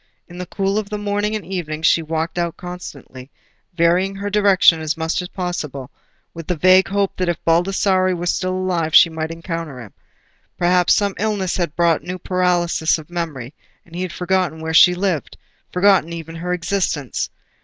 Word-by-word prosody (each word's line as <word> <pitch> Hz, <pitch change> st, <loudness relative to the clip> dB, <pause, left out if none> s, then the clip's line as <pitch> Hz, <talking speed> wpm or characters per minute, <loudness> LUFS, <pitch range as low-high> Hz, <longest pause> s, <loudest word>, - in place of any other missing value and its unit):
In 175 Hz, 0 st, -11 dB
the 180 Hz, -, -5 dB
cool 195 Hz, +3 st, -1 dB
of 205 Hz, -2 st, -6 dB
the 210 Hz, -, -3 dB
morning 205 Hz, +1 st, -1 dB
and 215 Hz, -, -5 dB
evening 160 Hz, -5 st, -5 dB
she 165 Hz, -, +4 dB
walked 160 Hz, +2 st, -3 dB
out 170 Hz, 0 st, -2 dB
constantly, 150 Hz, -7 st, -9 dB, 0.5 s
varying 175 Hz, +3 st, +2 dB
her 200 Hz, +1 st, -4 dB
direction 200 Hz, -5 st, +5 dB
as 155 Hz, 0 st, -2 dB
much 160 Hz, +2 st, -1 dB
as 180 Hz, -, -6 dB
possible, 150 Hz, -8 st, -5 dB, 0.4 s
with 165 Hz, -2 st, -9 dB
the 180 Hz, -, 0 dB
vague 185 Hz, +3 st, +5 dB
hope 200 Hz, 0 st, -1 dB
that 185 Hz, -1 st, 0 dB
if 175 Hz, -, 0 dB
Baldassarre 185 Hz, +2 st, +2 dB
were 175 Hz, 0 st, -4 dB
still 185 Hz, +1 st, -1 dB
alive 175 Hz, -4 st, -1 dB
she 170 Hz, -, +8 dB
might 160 Hz, 0 st, -4 dB
encounter 165 Hz, -4 st, -6 dB
him. 110 Hz, -5 st, -11 dB, 0.6 s
Perhaps 180 Hz, 0 st, +3 dB
some 200 Hz, -2 st, 0 dB
illness 205 Hz, -3 st, -1 dB
had 170 Hz, -3 st, -2 dB
brought 170 Hz, -2 st, +2 dB
a -, -, -17 dB
new 180 Hz, +1 st, -4 dB
paralysis 175 Hz, -3 st, +1 dB
of 155 Hz, +1 st, -12 dB
memory, 155 Hz, -7 st, -5 dB, 0.3 s
and 170 Hz, -, -20 dB
he 180 Hz, -, -3 dB
had 185 Hz, -1 st, -3 dB
forgotten 180 Hz, -3 st, -1 dB
where 160 Hz, 0 st, -4 dB
she 180 Hz, +3 st, +7 dB
lived—forgotten 180 Hz, 0 st, 0 dB
even 165 Hz, -1 st, -7 dB
her 180 Hz, +2 st, -4 dB
existence. 180 Hz, -, -2 dB
175 Hz, 180 wpm, -20 LUFS, 165-185 Hz, 0.6 s, she